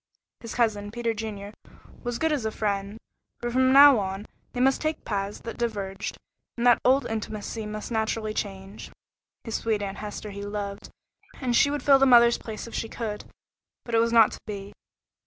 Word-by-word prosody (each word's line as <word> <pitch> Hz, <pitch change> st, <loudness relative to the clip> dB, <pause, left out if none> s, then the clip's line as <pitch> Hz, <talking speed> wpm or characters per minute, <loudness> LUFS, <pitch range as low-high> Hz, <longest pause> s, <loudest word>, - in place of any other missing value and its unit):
His 230 Hz, -, -8 dB
cousin, 210 Hz, -4 st, +1 dB
Peter 230 Hz, +1 st, -2 dB
Junior, 210 Hz, -2 st, -6 dB, 0.5 s
was 240 Hz, -1 st, -3 dB
good 320 Hz, +3 st, +1 dB
as 290 Hz, -6 st, 0 dB
a 220 Hz, -, 0 dB
friend, 200 Hz, -1 st, -2 dB, 0.4 s
but 240 Hz, 0 st, -3 dB
from 260 Hz, +1 st, +3 dB
now 280 Hz, -2 st, +8 dB
on 195 Hz, +1 st, -4 dB, 0.3 s
they 245 Hz, -, -4 dB
must 265 Hz, +2 st, +3 dB
take 310 Hz, 0 st, -2 dB
paths 200 Hz, -1 st, -3 dB
that 230 Hz, -, -7 dB
diverged, 200 Hz, -5 st, -3 dB, 0.4 s
and 240 Hz, -, -1 dB
that 245 Hz, -1 st, +5 dB
old 270 Hz, +2 st, +4 dB
intimacy 220 Hz, 0 st, -4 dB
must 215 Hz, +2 st, -6 dB
naturally 220 Hz, -1 st, -1 dB
change. 195 Hz, -1 st, -6 dB, 0.5 s
His 225 Hz, -, -6 dB
sweet 215 Hz, -2 st, 0 dB
Aunt 195 Hz, 0 st, -5 dB
Hester 210 Hz, 0 st, -6 dB
he 200 Hz, 0 st, -7 dB
loved, 205 Hz, -1 st, -5 dB, 0.5 s
and 250 Hz, -3 st, 0 dB
she 285 Hz, -, +5 dB
would 290 Hz, 0 st, -3 dB
fill 275 Hz, -1 st, +6 dB
the 270 Hz, -, +5 dB
mother's 235 Hz, -1 st, +6 dB
place 220 Hz, -2 st, -7 dB
if 230 Hz, -, -11 dB
she 225 Hz, -, -3 dB
could, 215 Hz, -3 st, -5 dB, 0.6 s
but 235 Hz, -, -7 dB
it 225 Hz, -, +5 dB
was 230 Hz, 0 st, +2 dB
not 230 Hz, -2 st, +6 dB
to -, -, -8 dB
be. 200 Hz, -1 st, -6 dB
220 Hz, 190 wpm, -26 LUFS, 205-240 Hz, 0.6 s, now